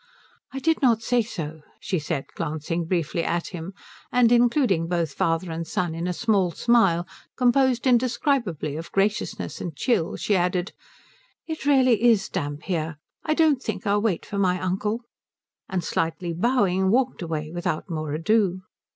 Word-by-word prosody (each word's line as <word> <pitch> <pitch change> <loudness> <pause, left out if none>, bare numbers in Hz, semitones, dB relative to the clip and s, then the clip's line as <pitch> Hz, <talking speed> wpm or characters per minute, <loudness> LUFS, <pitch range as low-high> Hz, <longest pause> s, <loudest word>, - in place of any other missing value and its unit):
"I 270 - -6
did 320 +4 +1
not 235 -4 +3
say 245 0 +2
so," 160 -8 -6 0.2
she 185 - -2
said, 150 -2 -3
glancing 160 +3 -3
briefly 170 -1 -1
at 170 0 -1
him; 180 +1 -7 0.4
and 245 -2 +4
including 240 - +3
both 170 -4 -1
father 165 +3 0
and 165 0 -4
son 175 0 -1
in 165 +2 -3
a - - 0
small 195 -1 +1
smile 185 -3 +3 0.3
composed 250 0 +3
indescribably 240 - +1
of 165 +1 -7
graciousness 205 +2 -1
and 170 -4 -5
chill 170 - 0
she 205 - 0
added, 180 +1 0 0.7
"It 315 -3 -5
really 255 -6 +4
is 230 -4 +4
damp 145 -4 -4
here 165 -4 -2 0.3
I 310 - 0
don't 305 -5 +3
think - - -4
I'll 205 0 +2
wait 210 -6 0
for 200 - -4
my 180 -2 +2
uncle," 205 +5 -1 0.7
and 185 -2 -1
slightly 165 +2 -2
bowing 190 -2 +2
walked 250 +2 +1
away 155 -2 -3
without 175 -1 -3
more 155 -4 -4
ado. 185 +3 +1
185 Hz, 160 wpm, -24 LUFS, 165-235 Hz, 0.7 s, and